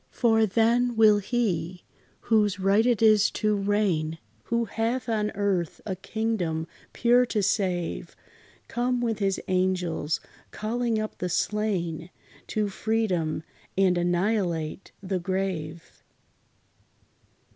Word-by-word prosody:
For 225 -2 +3
then 235 +4 +2
will 215 -2 +6
He, 190 -6 -2 0.4
"whose 210 -3 +2
right 200 +5 +3
it 235 -2 +2
is 215 -2 +6
to 215 -1 +1
reign," 195 -6 0 0.3
Who 235 0 0
hath 230 +4 -2
on 215 -2 0
earth 190 -5 -1
a 190 - -2
kingdom 190 -5 -2 0.3
pure 245 +1 +4
to 215 -3 0
save, 185 -3 -1 0.5
Come 245 +1 0
with 230 -3 -1
his 195 -2 0
angels, 180 -4 0 0.3
calling 230 +1 -1
up 215 0 -4
the 180 - -2
slain 180 -4 -1 0.4
To 215 -1 0
freedom, 190 -7 -1 0.3
and 190 -2 +4
annihilate 175 -1 -1
the 190 -1 -1
grave. 175 -3 -4
200 Hz, 115 wpm, -26 LUFS, 180-225 Hz, 0.5 s, will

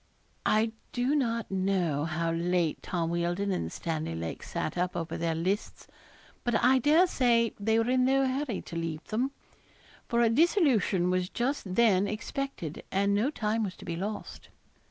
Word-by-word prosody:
I 220 +1 +3 0.2
do 250 +3 +1
not 230 -7 0
know 185 -6 0
how 165 +1 -1
late 170 -1 0
Tom 170 -2 -2
Wealdon 175 +4 0
and 85 - -2
Stanley 155 - -3
Lake 80 0 -5
sat - - -3
up 180 0 -1
over 165 -1 -3
their 165 -1 -1
lists; 185 +6 -2 0.6
but 240 -2 0
I 260 +2 +5
dare 305 +7 +5
say 235 -8 +2
they 220 +2 +2
were 225 0 +2
in 255 0 +3
no 270 +1 +3
hurry 260 -4 -2
to 170 - -9
leave 165 -2 -3
them, 240 +5 0 0.8
for 235 0 +2
a 230 - +5
dissolution 245 - +3
was 185 0 0
just 240 -7 -2
then 205 -4 +4
expected, 215 - -4
and 200 +1 +2
no 215 +7 +2
time 225 -5 -1
was 190 -3 -4
to - - -12
be 170 - -3
lost. 205 +5 -6
200 Hz, 170 wpm, -29 LUFS, 170-240 Hz, 0.8 s, I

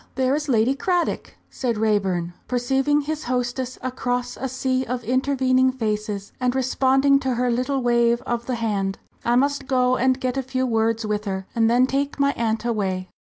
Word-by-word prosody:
there 260 0 +1
is 300 0 -2
Lady 235 +1 +3
Cradock!" 350 +4 -1 0.2
said 240 -4 -2
Raeburn, 195 -5 0
perceiving 270 +4 +1
his 305 +1 -4
hostess 250 +1 -2
across 245 -1 -2
a 265 - -4
sea 260 0 -1
of 250 -1 -4
intervening 260 +1 +2
faces, 210 -4 -3
and 250 0 0
responding 265 +2 +3
to 260 -2 -1
her 245 +1 +1
little 255 +2 -1
wave 235 -1 +3
of 240 0 -3
the 255 - -1
hand. 200 -4 -1 0.3
"I 240 - +2
must 275 +1 +1
go 255 -2 +2
and 260 +1 +2
get 255 0 -2
a - - +1
few 260 0 -2
words 225 -1 0
with 210 0 -2
her, 190 -1 -3
and 225 -1 +3
then 245 +2 +4
take 280 +2 -2
my 280 0 +3
aunt 225 -2 -2
away." 190 -5 -2
250 Hz, 180 wpm, -23 LUFS, 225-265 Hz, 0.3 s, then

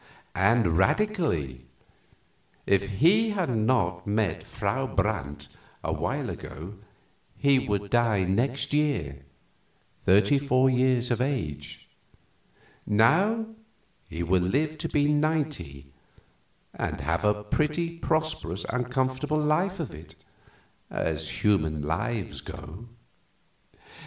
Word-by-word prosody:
And 95 -3 +3
radically. 95 - 0 1.0
If 100 0 +2
he 215 +8 +5
had 190 -9 -1
not 110 -6 +1
met 105 0 0
Frau 120 +7 -2
Brandt 75 - -2 0.3
awhile - - -2
ago 85 +7 -8 0.6
he 140 -1 +4
would 100 -4 -2
die 115 -5 +3
next 120 +11 0
year, 90 - 0 0.8
thirty 105 +9 +4
four 130 -1 +3
years 125 -1 +2
of 120 - +1
age. 75 - -3 1.0
Now 180 - +3 0.6
he 85 +2 -4
will 90 +2 +2
live 150 - 0
to - - -3
be 145 -1 +2
ninety, 150 - -1 0.8
and - - -3
have 80 +6 -1
a 105 0 +1
pretty 165 +8 -1
prosperous 155 - -1
and 125 +1 -2
comfortable 130 +4 0
life 165 +6 +1
of 155 -8 -4
it, 80 +3 -12 0.7
as - - -3
human 80 -7 +2
lives 85 +7 -2
go." 100 +10 -9
115 Hz, 105 wpm, -27 LUFS, 90-150 Hz, 1.0 s, he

